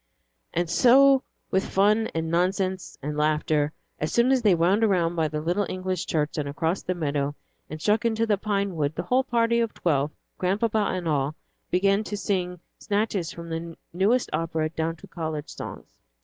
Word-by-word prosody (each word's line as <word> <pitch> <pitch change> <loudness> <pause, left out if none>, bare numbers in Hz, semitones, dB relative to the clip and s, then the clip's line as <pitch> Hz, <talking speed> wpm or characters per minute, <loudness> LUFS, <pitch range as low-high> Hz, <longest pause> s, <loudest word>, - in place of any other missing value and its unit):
And 175 0 0
so 265 +8 +6 0.3
with 190 +1 +2
fun 210 +3 +3
and 160 0 -1
nonsense 185 +1 0
and 150 +1 -3
laughter, 150 0 +1 0.3
as 155 - -2
soon 235 +2 +3
as 265 -2 +3
they 205 -5 +5
wound 185 +6 +3
around 175 -5 +2
by 160 -2 +1
the 150 0 -3
little 180 +5 0
English 185 0 -3
church 155 -1 -1
and 145 -1 -2
across 165 +5 -1
the 185 - -2
meadows, 145 -3 -1 0.3
and 155 - -6
struck 210 +6 +2
into 230 -1 +1
the 215 -2 +2
pine 200 -3 -1
wood, 150 -1 -1
the - - -2
whole 255 +1 +2
party 235 -1 +2
of 230 -2 -1
twelve, 145 -4 +1 0.3
Grandpapa 210 +3 +1
and 180 -2 -3
all, 145 -1 0 0.3
began 195 +3 +2
to 205 - -4
sing 180 -3 -2 0.2
snatches 200 -4 -1
from 170 0 -9
the 165 0 -5 0.2
newest 210 +8 +2
operas 160 0 -1
down 165 +1 -1
to - - -14
college 155 -3 -4
songs. - - -9
180 Hz, 180 wpm, -26 LUFS, 160-210 Hz, 0.3 s, so